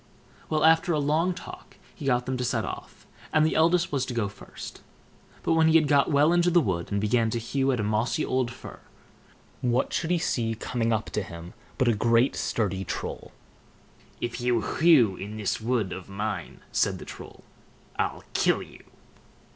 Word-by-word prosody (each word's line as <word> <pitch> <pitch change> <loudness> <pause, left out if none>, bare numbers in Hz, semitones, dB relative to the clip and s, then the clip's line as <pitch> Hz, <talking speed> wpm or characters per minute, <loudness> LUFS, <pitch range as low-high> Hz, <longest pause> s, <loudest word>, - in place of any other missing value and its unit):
Well, 155 -1 +1
after 165 +2 +4
a 155 - +1
long 160 +5 +1
talk - - -11 0.2
he 150 - -9
got 125 -2 +2
them 130 - -2
to 125 - -2
set 125 - 0
off, - - -8 0.3
and 155 -1 +4
the 160 - +1
eldest 165 +2 +3
was 140 -3 0
to 125 - -4
go 105 -4 0
first. 100 - -10 0.6
But 165 - +2
when 160 0 +4
he 160 - +4
had 155 -2 +5
got 140 -1 +3
well 150 +3 +4
into 175 0 +3
the 175 0 +5
wood, 95 - -2
and 100 - +1
began 115 +2 +2
to 120 - -2
hew 135 +4 0
at 125 - -1
a - - 0
mossy 110 +8 0
old 130 -2 0
fir, 120 - -10 0.8
what 125 +1 +1
should 165 - -1
he 175 - +3
see 115 -9 -1
coming 115 0 -1
up 110 -1 -1
to 105 - -1
him 85 -1 -9 0.2
but 130 - +2
a 120 - +5
great 115 +4 +3
sturdy 95 -4 -1
Troll. - - -5 0.9
"If 120 +1 -4
you 120 -2 +2
hew 125 - +4
in 105 +2 -7
this 105 0 -2
wood 110 -5 0
of 95 +1 -8
mine", 105 +2 -4
said - - +1
the - - -10
Troll, - - -11 0.6
"I'll - - -1
kill - - +2
you!" - - -15
125 Hz, 195 wpm, -26 LUFS, 110-155 Hz, 0.9 s, had